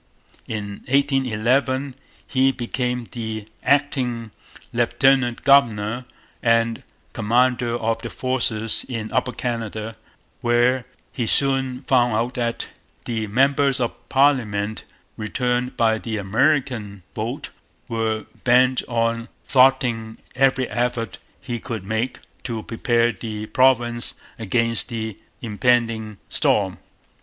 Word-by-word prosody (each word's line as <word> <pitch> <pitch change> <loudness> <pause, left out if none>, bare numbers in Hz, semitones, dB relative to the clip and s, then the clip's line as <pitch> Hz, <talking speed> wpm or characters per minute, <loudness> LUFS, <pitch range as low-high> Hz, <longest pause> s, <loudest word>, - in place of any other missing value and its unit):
In 100 -2 -5
1811 135 0 +1 0.3
he 135 0 +3
became 125 -1 -2
the 110 -3 -4 0.2
acting 125 -5 +1 0.4
lieutenant 130 -3 +2
governor 120 -4 +3 0.4
and 115 -1 +2 0.3
commander 120 +2 +2
of 115 0 -1
the - - -5
forces 115 -4 0
in 115 -3 -4
Upper 130 0 +1
Canada, 115 -3 -4 0.5
where 120 +1 +2 0.3
he 120 - -2
soon 135 0 +1
found 120 -4 +3
out 120 +3 0
that 120 -2 -2 0.4
the 110 -2 -2
members 135 +4 +3
of 120 -2 0 0.2
parliament 110 -7 +2 0.3
returned 125 +3 -1
by 110 -1 +3
the 110 -1 -3
'American 110 - 0
vote' - - -4 0.4
were 110 -1 -1 0.2
bent 125 +1 +4
on 115 0 0 0.2
thwarting 125 -4 +3 0.2
every 130 -1 +2
effort 120 -2 -2 0.2
he 120 -2 -4
could 110 -5 -5
make 110 +5 -1 0.3
to 115 -3 -4
prepare 120 0 +1
the 110 0 -6
province 120 -1 +2 0.2
against 115 +1 0
the 110 -3 -4 0.2
impending 115 -1 +1
storm. 95 -3 +1
120 Hz, 105 wpm, -22 LUFS, 110-130 Hz, 0.5 s, bent